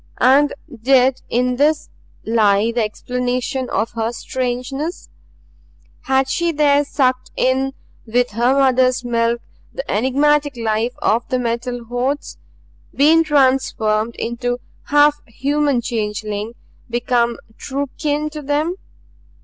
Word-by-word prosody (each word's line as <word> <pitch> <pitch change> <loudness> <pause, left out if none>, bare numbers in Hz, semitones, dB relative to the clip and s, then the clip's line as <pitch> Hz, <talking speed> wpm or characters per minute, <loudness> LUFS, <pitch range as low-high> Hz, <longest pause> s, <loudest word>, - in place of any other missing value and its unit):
And 275 +3 +4 0.3
did 260 +1 +3
in 250 +1 +1
this 300 +3 +1 0.3
lie 215 -1 +3
the 235 0 0
explanation 250 +4 -2
of 220 +3 -1
her 225 0 -2
strangeness? 260 +7 -4 1.0
Had 265 0 +2
she 340 +5 0
there 290 -2 +3
sucked 255 -3 0
in 265 +1 +1 0.3
with 245 +2 +1
her 240 +5 +2
mother's 255 -2 +3
milk 235 0 0 0.3
the - - -5
enigmatic 285 +4 +2
life 225 +1 -1
of 230 +3 +1
the 255 - +1
Metal 240 0 -3
Hordes, 245 +5 -3 0.6
been 315 +4 +5
transformed 255 -6 +1
into 245 +1 -2 0.3
half 295 0 +4
human 280 +2 0
changeling, 215 -1 -3 0.4
become 240 0 0 0.2
true 280 +1 -3
kin 300 0 -1
to 305 0 -6
them? 300 +5 -1
255 Hz, 115 wpm, -19 LUFS, 235-285 Hz, 1.0 s, been